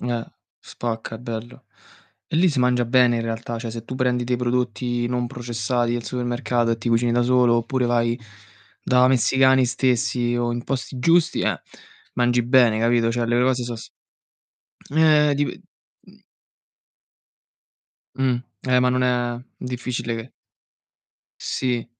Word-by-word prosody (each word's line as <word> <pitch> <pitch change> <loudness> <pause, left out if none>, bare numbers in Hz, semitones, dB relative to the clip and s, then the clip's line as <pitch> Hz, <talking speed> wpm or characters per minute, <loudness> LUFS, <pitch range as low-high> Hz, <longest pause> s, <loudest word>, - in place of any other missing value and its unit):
Eh, 120 -2 -3 0.3
spacca 115 -1 -5
è - - -14
bello. 115 0 -7 0.6
E - - -6
lì 180 +3 +4
si 145 -5 -1
mangia 125 -1 +2
bene 120 0 +3
in 115 - -2
realtà, 115 +1 -4
cioè 115 0 -5
se 115 0 -7
tu 130 - -7
prendi 125 -2 0
dei 125 +1 0
prodotti 120 -1 -1
non 125 0 -1
processati 120 0 -2
al 120 -1 -3
supermercato 120 -1 -1
e 115 - +1
ti 115 - -3
cucini 115 +1 +2
da 120 +1 +2
solo 125 -1 +3
oppure 125 +2 -1
vai 120 0 +1 0.6
da 125 0 +4
messicani 130 +1 +4
stessi 120 0 0
o 120 0 0
in 120 +1 -4
posti 130 -1 -4
giusti, 165 +5 +3
eh, - - -1 0.5
mangi 120 0 +2
bene, 120 -3 +4
capito? 115 0 +2
Cioè 120 0 -1
le 120 +1 +2
cose 130 0 +1
so 120 -1 -5
s - - -11 1.0
ehm, 150 -1 +4
dip 145 +1 0 0.6
mh. - - -20 1.9
Mh. 130 -2 +1 0.3
Eh, 125 0 +4
ma 125 - +3
non 125 0 +1
è 120 -1 0 0.2
difficile 125 -2 -4
che 115 +3 -8 1.1
Sì, 125 -3 -2
120 Hz, 150 wpm, -22 LUFS, 120-125 Hz, 1.9 s, lì